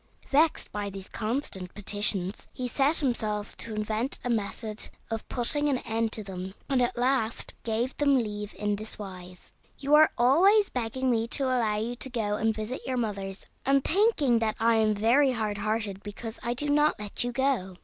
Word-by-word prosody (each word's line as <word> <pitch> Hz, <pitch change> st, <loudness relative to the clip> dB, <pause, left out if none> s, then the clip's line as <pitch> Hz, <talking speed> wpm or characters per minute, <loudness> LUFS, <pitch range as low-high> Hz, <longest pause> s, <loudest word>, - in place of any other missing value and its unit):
Vexed 305 Hz, +3 st, +3 dB
by 205 Hz, -1 st, -3 dB
these 195 Hz, -1 st, -8 dB
constant 215 Hz, -6 st, -3 dB
petitions, 205 Hz, -1 st, 0 dB
he 255 Hz, -, -4 dB
set 275 Hz, +5 st, +2 dB
himself 215 Hz, -6 st, -1 dB
to 225 Hz, -2 st, -5 dB
invent 215 Hz, +4 st, -1 dB
a 245 Hz, -, -1 dB
method 215 Hz, 0 st, -2 dB, 0.2 s
of 225 Hz, -1 st, -4 dB
putting 290 Hz, +4 st, +1 dB
an 270 Hz, -, +2 dB
end 225 Hz, -2 st, -1 dB
to 215 Hz, -, -3 dB
them, 190 Hz, 0 st, -7 dB
and 265 Hz, -2 st, +2 dB
at 245 Hz, -, 0 dB
last 245 Hz, -2 st, 0 dB
gave 235 Hz, +3 st, -1 dB
them 280 Hz, -2 st, +4 dB
leave 210 Hz, -3 st, -3 dB
in 210 Hz, -1 st, -1 dB
this 215 Hz, +1 st, -2 dB
wise: 185 Hz, -3 st, -10 dB, 0.2 s
"You 280 Hz, +1 st, -1 dB
are 310 Hz, +1 st, +8 dB
always 375 Hz, -, +5 dB
begging 250 Hz, +2 st, -1 dB
me 225 Hz, -1 st, +1 dB
to 275 Hz, -, -1 dB
allow 240 Hz, -5 st, +1 dB
you 225 Hz, +3 st, -2 dB
to 265 Hz, -, 0 dB
go 215 Hz, -4 st, -1 dB
and 220 Hz, +1 st, +2 dB
visit 220 Hz, +4 st, -4 dB
your 260 Hz, -1 st, -1 dB
mothers, 200 Hz, -4 st, -3 dB, 0.2 s
and 275 Hz, 0 st, +3 dB
thinking 320 Hz, -, +3 dB
that 220 Hz, -1 st, 0 dB
I 230 Hz, 0 st, +4 dB
am 215 Hz, -1 st, +3 dB
very 250 Hz, +6 st, +4 dB
hard 215 Hz, -3 st, -2 dB
hearted 215 Hz, -2 st, -1 dB
because 220 Hz, +2 st, -7 dB
I 240 Hz, +1 st, -2 dB
do 290 Hz, +4 st, 0 dB
not 295 Hz, +1 st, +3 dB
let 210 Hz, +2 st, -1 dB
you 245 Hz, -, -2 dB
go. 245 Hz, -8 st, 0 dB
225 Hz, 190 wpm, -28 LUFS, 210-260 Hz, 0.2 s, are